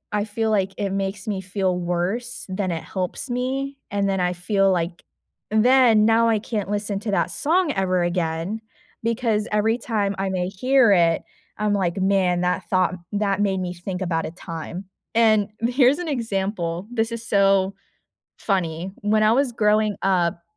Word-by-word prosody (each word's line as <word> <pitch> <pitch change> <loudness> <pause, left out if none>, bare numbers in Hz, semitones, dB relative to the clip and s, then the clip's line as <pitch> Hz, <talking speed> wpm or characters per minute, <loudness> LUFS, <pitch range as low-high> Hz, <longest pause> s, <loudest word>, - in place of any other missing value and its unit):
I 205 0 0
feel 220 +1 -1
like 195 -2 +1
it 200 -1 -2
makes 195 0 -3
me 200 -3 -2
feel 185 -1 -1
worse, 180 +8 -2
than 190 0 -2
it 165 -1 -4
helps 185 +7 -4
me, 270 +3 -2
and 200 0 0
then 195 -1 0
I 180 0 +1
feel 195 +2 +1
like 175 -1 -2 0.5
then, 230 -1 +5
now 225 +1 +4
I 225 - +3
can't 205 -2 -4
listen 205 -1 -2
to 210 - -3
that 195 - +1
song 335 +1 +1
ever 185 -2 +1
again, 175 +4 -2 0.4
because 230 -2 0
every 215 +2 +2
time 215 -6 -1
I 195 0 -1
may 180 -1 -1
hear 250 +4 +3
it, 170 -3 +3 0.3
I'm, 210 -1 0
like, 190 -3 0
"Man 190 -2 +2
that 180 +1 -1
thought 185 -2 +2 0.2
that 205 -1 0
made 195 -2 +1
me 180 -1 -3
think 180 +1 -6
about 165 -2 -1
a - - -7
time," 170 +2 -7 0.3
and 215 -3 +4
here's 250 +3 +3
an 355 - -4
example, 195 - -2
this 225 -1 0
is 230 0 -5
so 195 -1 +3 0.7
funny, 180 -3 -1
when 215 +1 +2
I 215 - +5
was 265 +1 +2
growing 215 -1 +2
up, 175 -3 +1
200 Hz, 170 wpm, -23 LUFS, 185-225 Hz, 0.7 s, then